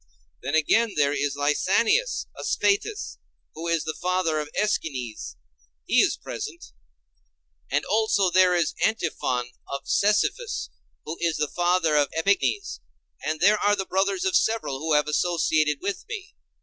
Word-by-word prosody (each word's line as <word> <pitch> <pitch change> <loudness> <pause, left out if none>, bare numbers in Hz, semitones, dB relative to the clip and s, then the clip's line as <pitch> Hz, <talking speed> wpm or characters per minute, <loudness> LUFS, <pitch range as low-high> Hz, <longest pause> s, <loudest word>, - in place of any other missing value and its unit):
Then 140 +4 -2
again 215 +8 +2
there 145 -1 +2
is 145 -1 -1
Lysanias 200 - +1
of - - -6
Sphettus, 415 +1 0 0.3
who 165 +2 -6
is 165 -2 +1
the 155 - -3
father 180 -3 0
of 150 -1 -5
Æschines—he 70 - -2
is - - +1
present; - - -7 1.0
and 145 +3 0
also 205 -3 +2
there 185 0 +5
is 170 -3 +1
Antiphon 130 - -1 0.2
of 140 0 -5
Cephisus, 215 - +1 0.3
who 160 - -6
is 170 -2 +1
the 150 -1 -2
father 175 -3 +2
of 145 -1 +3
Epignes; 200 - 0 0.4
and 155 0 -2
there 210 +3 +5
are 205 0 +3
the 190 -1 -3
brothers 195 0 0
of 190 - +1
several 220 -12 +1
who 160 +1 -1
have 150 0 +3
associated 155 -2 +1
with 200 0 -3
me. 440 -6 -7
170 Hz, 145 wpm, -25 LUFS, 150-200 Hz, 1.0 s, there